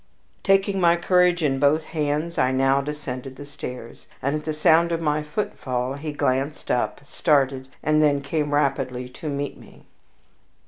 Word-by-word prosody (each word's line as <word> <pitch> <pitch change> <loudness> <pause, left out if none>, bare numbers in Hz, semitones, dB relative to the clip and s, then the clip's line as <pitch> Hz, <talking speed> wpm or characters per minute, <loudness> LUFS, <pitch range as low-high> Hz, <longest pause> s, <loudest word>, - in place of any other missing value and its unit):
Taking 195 0 +2
my 170 -1 +5
courage 180 0 +3
in 135 -3 +1
both 145 +3 +3
hands, 155 +2 -2
I 130 - +3
now 135 +1 +3
descended 135 -3 -5
the 145 - -9
stairs, 125 -4 -8
and 140 +3 -1
at 150 - -4
the 155 - -1
sound 160 +2 +4
of 165 - 0
my 150 -2 0
footfall 135 -6 -3
he 150 +2 -5
glanced 140 0 -1
up, 120 +2 -1
started, 135 -3 +1 0.2
and 155 +1 +3
then 145 -2 +3
came 145 +1 -2
rapidly 135 -3 0
to 150 +4 -7
meet 140 0 -4
me. - - -17
145 Hz, 165 wpm, -24 LUFS, 135-155 Hz, 0.2 s, my